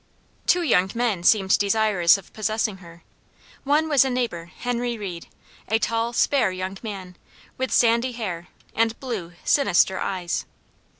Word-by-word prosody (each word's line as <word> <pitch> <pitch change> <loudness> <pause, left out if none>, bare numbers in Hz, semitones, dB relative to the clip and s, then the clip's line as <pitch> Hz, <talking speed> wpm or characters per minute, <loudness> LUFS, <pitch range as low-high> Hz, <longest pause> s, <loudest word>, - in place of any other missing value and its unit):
Two 355 -1 +3
young 190 - +3
men 230 -6 0
seemed 190 +1 +4
desirous 200 -3 +3
of 195 - -15
possessing 215 -1 -1
her. 170 -2 -15 0.6
One 295 +3 +2
was 285 -4 +5
a 265 - -1
neighbor, 240 -10 -2
Henry 240 +5 -3
Reed, 180 -5 -7 0.4
a 220 - +2
tall, 230 +1 -1
spare 240 -2 +2
young 185 +1 -5
man, 190 -5 -7 0.4
with 260 0 -3
sandy 235 +2 +3
hair, 185 -7 -5 0.3
and 225 +1 0
blue, 210 -10 -5
sinister 200 -8 +3
eyes. 180 -3 -3
215 Hz, 140 wpm, -23 LUFS, 185-240 Hz, 0.6 s, was